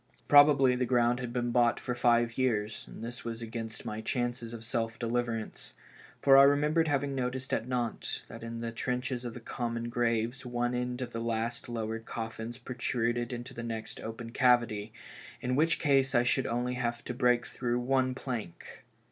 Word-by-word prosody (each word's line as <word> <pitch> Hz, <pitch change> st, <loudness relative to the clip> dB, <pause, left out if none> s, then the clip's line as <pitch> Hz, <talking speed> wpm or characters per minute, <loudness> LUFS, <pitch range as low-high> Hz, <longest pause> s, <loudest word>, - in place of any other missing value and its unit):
Probably 145 Hz, -3 st, +7 dB
the 125 Hz, 0 st, 0 dB
ground 120 Hz, 0 st, +3 dB
had 125 Hz, -1 st, -4 dB
been 120 Hz, 0 st, -1 dB
bought 120 Hz, -1 st, +3 dB
for 125 Hz, -, -3 dB
five 120 Hz, -1 st, +3 dB
years, 110 Hz, -4 st, 0 dB
and -, -, -10 dB
this 120 Hz, +1 st, -6 dB
would 115 Hz, -1 st, -4 dB
be 115 Hz, -, -5 dB
against 115 Hz, -1 st, -6 dB
my 110 Hz, +1 st, -4 dB
chances 120 Hz, 0 st, -2 dB
of 115 Hz, -1 st, -7 dB
self 115 Hz, -1 st, -2 dB
deliverance, 115 Hz, -1 st, -3 dB, 0.5 s
for 135 Hz, -1 st, +8 dB
I -, -, +10 dB
remembered 150 Hz, +4 st, +4 dB
having 140 Hz, -1 st, 0 dB
noticed 130 Hz, 0 st, -2 dB
at 115 Hz, -, 0 dB
Nantes 120 Hz, -2 st, -2 dB
that -, -, -10 dB
in 115 Hz, 0 st, -6 dB
the 115 Hz, 0 st, -3 dB
trenches 125 Hz, +1 st, -2 dB
of 120 Hz, -, -5 dB
the -, -, -6 dB
common 115 Hz, 0 st, -3 dB
graves 120 Hz, +1 st, 0 dB
one 120 Hz, -1 st, -1 dB
end 125 Hz, +1 st, -2 dB
of 120 Hz, -, -7 dB
the 115 Hz, -, -4 dB
last 115 Hz, +1 st, -2 dB
lowered 115 Hz, -1 st, -4 dB
coffins 115 Hz, +1 st, -5 dB
protruded 120 Hz, -1 st, -1 dB
into 125 Hz, +2 st, -6 dB
the 115 Hz, -, -6 dB
next 115 Hz, -1 st, -5 dB
open 115 Hz, +1 st, -6 dB
cavity, 120 Hz, -5 st, +2 dB, 0.5 s
in 125 Hz, +1 st, -1 dB
which 160 Hz, +3 st, +3 dB
case 135 Hz, -3 st, +3 dB
I 120 Hz, -, +5 dB
should 125 Hz, +1 st, +1 dB
only 125 Hz, +1 st, -1 dB
have 120 Hz, -1 st, -1 dB
had 120 Hz, -, -19 dB
to -, -, -3 dB
break 125 Hz, -1 st, +3 dB
through 120 Hz, -1 st, -2 dB
one 130 Hz, 0 st, +1 dB
plank. 120 Hz, -10 st, -6 dB
120 Hz, 190 wpm, -30 LUFS, 115-125 Hz, 0.5 s, I